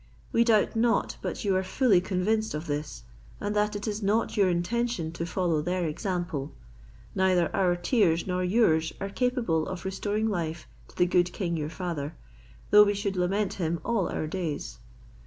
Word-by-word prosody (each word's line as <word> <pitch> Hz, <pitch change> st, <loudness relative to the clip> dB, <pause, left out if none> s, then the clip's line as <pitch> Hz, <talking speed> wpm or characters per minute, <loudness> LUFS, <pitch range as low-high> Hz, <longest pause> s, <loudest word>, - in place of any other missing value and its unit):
We 230 Hz, -, +4 dB
doubt 225 Hz, -1 st, +3 dB
not 230 Hz, +1 st, +1 dB
but -, -, -4 dB
you 195 Hz, -2 st, +2 dB
are 185 Hz, -, +2 dB
fully 190 Hz, 0 st, +3 dB
convinced 210 Hz, +2 st, 0 dB
of 155 Hz, +2 st, -4 dB
this, 145 Hz, -, -4 dB, 0.4 s
and 205 Hz, +1 st, -2 dB
that 210 Hz, 0 st, +1 dB
it 205 Hz, +2 st, -4 dB
is 210 Hz, 0 st, -2 dB
not 215 Hz, +3 st, +1 dB
your 200 Hz, -3 st, +4 dB
intention 175 Hz, 0 st, -1 dB
to 170 Hz, 0 st, -4 dB
follow 170 Hz, -3 st, 0 dB
their 180 Hz, +2 st, -1 dB
example. 160 Hz, -3 st, -3 dB, 0.6 s
Neither 185 Hz, -3 st, +2 dB
our 180 Hz, -2 st, +3 dB
tears 175 Hz, -2 st, +2 dB
nor 185 Hz, -1 st, -1 dB
yours 180 Hz, -5 st, +3 dB
are 195 Hz, -, -3 dB
capable 230 Hz, -, 0 dB
of 185 Hz, -2 st, -6 dB
restoring 205 Hz, +3 st, -1 dB
life 170 Hz, -5 st, -3 dB, 0.2 s
to -, -, -19 dB
the 180 Hz, -, +4 dB
good 175 Hz, 0 st, +2 dB
king 175 Hz, -2 st, -2 dB
your 150 Hz, -2 st, -2 dB
father, 160 Hz, -3 st, -4 dB, 0.6 s
though 210 Hz, 0 st, +9 dB
we 205 Hz, 0 st, +1 dB
should 200 Hz, -1 st, -2 dB
lament 190 Hz, +3 st, 0 dB
him 170 Hz, -2 st, -2 dB
all 225 Hz, -6 st, 0 dB
our -, -, -2 dB
days. 155 Hz, -, -4 dB
185 Hz, 175 wpm, -27 LUFS, 170-210 Hz, 0.6 s, though